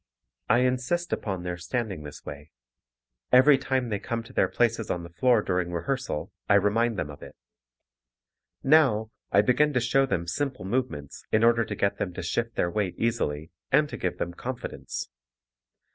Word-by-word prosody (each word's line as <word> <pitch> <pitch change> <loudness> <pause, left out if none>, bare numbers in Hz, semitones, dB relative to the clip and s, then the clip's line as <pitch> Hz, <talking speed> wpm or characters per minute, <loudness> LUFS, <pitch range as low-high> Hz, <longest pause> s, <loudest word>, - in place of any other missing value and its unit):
I 120 +2 +5
insist 130 +8 0
upon 95 -4 -3
their 90 -1 -3
standing 95 -1 -3
this 75 -1 -10
way. 75 +1 -8 0.8
Every 130 +2 +7
time 130 -2 -1
they 105 -2 -1
come 115 +2 -3
to 115 - -14
their - - +3
places 115 -2 0
on 90 - -2
the 85 - -10
floor 120 0 +3
during 90 -2 -1
rehearsal, 85 - -3 0.2
I 100 - +6
remind 105 +3 +2
them 75 -4 -3
of 70 - -12
it. - - -11 1.3
Now, 130 -7 +4 0.2
I 100 - +5
begin 150 +6 +3
to 125 - +3
show 135 +3 +2
them 85 -9 -1
simple 130 +2 -2
movements 100 - -3
in 110 +1 +3
order 115 0 +5
to - - -5
get 100 - 0
them 90 -3 -3
to 95 - -5
shift 115 +7 -2
their 85 - 0
weight 100 -3 -1
easily 80 -10 -1 0.2
and 150 - +4
to - - -5
give 90 - -2
them 85 - -3
confidence. 125 +6 -5
110 Hz, 175 wpm, -27 LUFS, 90-125 Hz, 1.3 s, Every